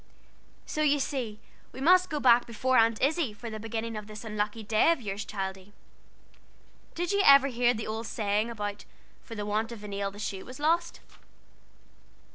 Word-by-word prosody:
"So 305 - -3
you 295 -1 +4
see 250 -6 -3 0.3
we - - -10
must 365 +6 +5
go 305 -2 -2
back 240 -3 +4
of 235 +2 -10
Aunt 230 -4 +4
Izzie 290 -4 +1
for 230 +2 -8
the 215 - -6
beginning 225 +1 -4
of 210 -1 -6
this 215 0 -9
unlucky 210 0 -3
day 215 +9 +3
of 335 - 0
yours, 205 -3 -4
Childie. 190 0 -6 1.2
Did 350 +2 -1
you 400 0 +2
ever 275 -4 +7
hear 245 -1 +2
the 220 - -4
old 220 +1 -4
saying 210 +1 -1
about, 205 -3 -5 0.4
'For 230 - -10
the 210 -1 -4
want 215 +2 -1
of 225 -3 -9
a - - -6
nail 200 0 -2
the 200 - -14
shoe 200 -2 -4
was 255 +3 -11
lost'?" 335 +3 0
225 Hz, 185 wpm, -28 LUFS, 210-270 Hz, 1.2 s, ever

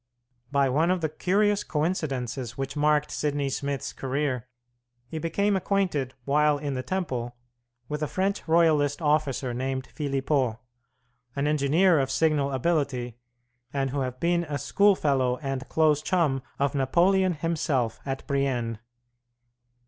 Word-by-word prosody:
By 140 -1 +3
one 150 +6 +2
of 185 -1 +1
the 155 - 0
curious 200 +6 +1
coincidences 135 -7 -2
which 135 +1 -4
marked 150 0 +2
Sidney 145 -2 -1
Smith's 140 0 -3
career, 130 -2 -2 0.6
he 160 +5 -5
became 200 +6 +1
acquainted 180 -9 0
while 150 +1 +3
in 145 -1 -3
the 130 - -2
Temple 130 -9 -3 0.5
with 150 0 -4
a 150 - 0
French 190 +7 -1
Royalist 155 -3 +3
officer 145 -5 0
named 130 +1 -3
Philippeaux, 135 -5 0 0.8
an 140 0 0
engineer 150 +4 +3
of 135 -1 0
signal 140 0 +1
ability, 130 -4 -1 0.5
and 135 -2 -1
who 140 - -2
had 130 -1 -3
been 170 0 +1
a 145 -2 -3
schoolfellow 140 -7 +2
and 135 -2 -3
a - - -9
close 155 -2 +2
chum 155 -7 +1 0.2
of 140 +1 0
Napoleon 180 +7 +3
himself 145 -7 -1
at 135 -1 -4
Brienne. 125 -5 -1
145 Hz, 135 wpm, -26 LUFS, 135-160 Hz, 0.8 s, By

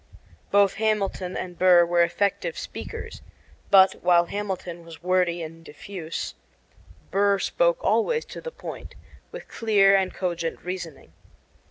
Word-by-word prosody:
Both 200 -1 +4
Hamilton 200 -4 -1
and 180 -1 -6
Burr 180 -2 +6
were 175 0 +2
effective 200 - 0
speakers; - - -7 0.5
but, 190 -1 +7
while 175 -1 +4
Hamilton 185 -3 -5
was 165 0 -13
wordy 180 -2 +1
and 165 +1 -10
diffuse, 165 +1 -6 0.8
Burr 200 0 +3
spoke - - +1
always 470 -1 +1
to - - -9
the 485 - -5
point, - - -9 0.4
with - - -9
clear 200 -3 +3
and 190 -1 +1
cogent 170 -3 -3
reasoning. 175 -4 -7
185 Hz, 130 wpm, -25 LUFS, 170-200 Hz, 0.8 s, but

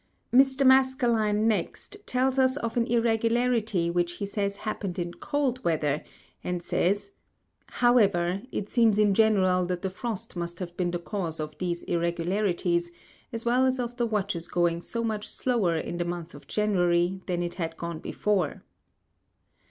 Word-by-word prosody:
Mr. 265 +1 +5
Maskelyne 240 -5 +3
next 225 - -2
tells 260 +1 +1
us 260 +1 +3
of 230 -5 -3
an 235 -1 +1
irregularity 230 -5 +1
which 175 0 0
he 200 - -4
says 200 0 -2
happened 200 -4 -4
in 175 -1 -3
cold 270 -1 -2
Weather, 150 -3 0 0.4
and 180 -1 -3
says, 200 - 0 0.6
ŌĆ£However, 200 -5 +2
it 205 - -3
seems 225 -2 +3
in 210 -2 +4
general 190 -4 +3
that 180 0 -3
the 190 - -1
Frost 220 0 -5
must 170 0 -4
have 175 -1 -6
been 175 -1 0
the 175 - -1
cause 170 -2 -4
of 155 0 -5
these 175 -1 -2
irregularities, 175 0 0 0.4
as 230 0 -4
well 245 +2 +3
as 260 0 +2
of 240 0 -3
the 240 -2 +1
WatchŌĆÖs 200 -6 -2
going 170 -1 +1
so 230 +5 -4
much 215 -2 -2
slower 220 -10 0
in 170 +2 -4
the - - +1
Month 175 -1 -5
of - - -13
January, 180 -3 +1
than 175 -2 -1
it 175 - -3
had 165 -3 -4
gone 170 -1 -5
before. 190 -3 -1
200 Hz, 160 wpm, -27 LUFS, 175-235 Hz, 0.6 s, Mr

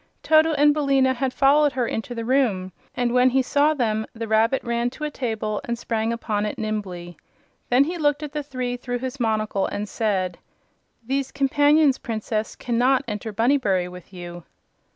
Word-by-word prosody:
Toto 315 0 +4
and 295 0 +4
Billina 275 -3 +2
had 260 +1 -1
followed 285 +2 +4
her 250 -2 0
into 230 +2 -4
the 230 -1 -4
room 225 -8 +1 0.2
and 245 -1 0
when 250 +1 +5
he 260 +1 +2
saw 295 +4 +2
them 220 -4 -1
the 230 0 -5
rabbit 220 +4 +2
ran 235 0 0
to 300 - -10
a 300 - -2
table 220 -5 -3
and 235 0 -3
sprang 225 -1 -2
upon 215 -3 -2
it 210 - -3
nimbly. 185 -5 -5 0.5
Then 250 +3 +5
he 340 +4 -4
looked 295 0 +1
at 295 - -5
the 300 0 -3
three 255 -3 -4
through 245 0 -4
his 260 +2 -5
monocle 215 -3 0
and 210 +1 -4
said: 190 -5 -1 0.7
"These 270 +2 -2
companions, 290 +1 +3
Princess, 220 -1 -3
cannot 250 +2 +1
enter 210 0 -4
Bunnybury 210 -5 +1
with 180 +1 -12
you." 175 -1 -8
245 Hz, 175 wpm, -23 LUFS, 215-275 Hz, 0.7 s, when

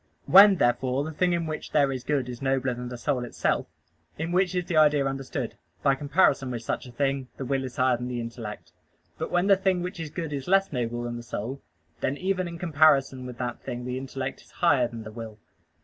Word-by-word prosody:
When, 195 +1 +9
therefore, 130 -1 +1
the 160 - -4
thing 180 +3 +1
in 170 -1 0
which 155 -1 -5
there 140 -2 +4
is 130 -2 -4
good 140 -3 0
is 125 0 -7
nobler 135 -1 +1
than 125 0 -6
the 125 - -6
soul 125 +1 -1
itself, 120 - -1 0.5
in 160 +2 -3
which 185 0 +2
is 180 -1 0
the 170 - -2
idea 150 -2 +5
understood; 135 -1 -4 0.2
by 140 - +5
comparison 140 -1 +2
with 120 -2 -4
such 120 - -3
a - - -10
thing, 135 +1 -1
the 135 - -4
will 135 +1 0
is 130 -1 -6
higher 130 -2 +3
than 125 +1 -5
the 125 -1 -3
intellect. 115 -2 -7 0.5
But - - -2
when 175 +1 +2
the 200 0 +6
thing 190 -2 +1
which 180 0 -5
is 160 -2 -4
good 160 -1 -4
is 135 -2 -4
less 195 -2 +3
noble 120 -1 -2
than 120 0 -4
the - - -6
soul, 120 +3 -5 0.4
then 140 - -1
even 185 0 -1
in 170 0 -7
comparison 145 -6 +3
with 125 -1 -8
that 120 -1 -4
thing 120 0 -5
the 125 +1 -3
intellect 135 0 -5
is - - -21
higher 145 -8 +3
than 115 -1 -8
the 110 - -8
will. 110 -1 -8
135 Hz, 230 wpm, -26 LUFS, 125-160 Hz, 0.5 s, When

